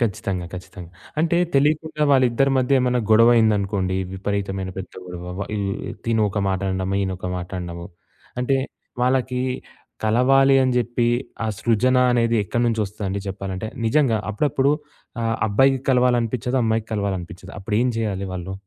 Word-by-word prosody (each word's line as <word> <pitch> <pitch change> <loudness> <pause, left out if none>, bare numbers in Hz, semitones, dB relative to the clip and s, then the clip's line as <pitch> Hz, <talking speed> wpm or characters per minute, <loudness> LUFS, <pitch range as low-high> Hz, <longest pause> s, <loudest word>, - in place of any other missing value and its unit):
ఖచ్చితంగా, 95 -5 -2
ఖచ్చితంగా. 90 -1 -9 0.3
అంటే, 170 +1 +2 0.2
తెలీకుండా 155 +2 +2
వాళ్ళిద్దరి 130 +1 +3
మధ్య 130 +1 +3
ఏమైనా 125 -1 +1
గొడవయిందనుకోండి, 105 -4 +4 0.2
విపరీతమైన 95 -1 -3
పెద్ద 95 - -7
గొడవ, 90 0 -7 0.2
వ 100 - -3
ఈ - - -1 0.5
తినొక 110 -3 +1
మాట 95 0 0
అనడము, 95 +1 -1
ఈయనొక 95 -1 -3
మాట 90 0 -6
అనడము. 85 -1 -6 0.5
అంటే, 135 +2 +2 0.5
వాళ్ళకి 125 0 +1 0.6
కలవాలి 135 +5 +4
అని 130 -1 +2
జెప్పి 120 0 +1 0.4
ఆ - - 0
సృజన 120 +3 +2 0.2
అనేది 115 -1 +2
ఎక్కడి 120 +5 -1
నుంచి 115 -1 0
వస్తుందండి 100 0 -4
జెప్పాలంటే? 95 +1 -4 0.2
నిజంగా, 120 -3 +3
అప్పుడప్పుడు 135 +4 +1 0.5
ఆహ్, 115 0 0
అబ్బాయికి 135 +5 +3
కలవాలనిపిచ్చదు, 125 0 +1
అమ్మాయికి 110 0 0
కలవాలనిపిచ్చదు. 95 -2 -4
అప్పుడు 100 +2 -4
ఏం 125 - +2
జేయాలి 100 -4 -2
వాళ్ళు? 95 0 -5
110 Hz, 135 wpm, -22 LUFS, 95-125 Hz, 0.6 s, గొడవయిందనుకోండి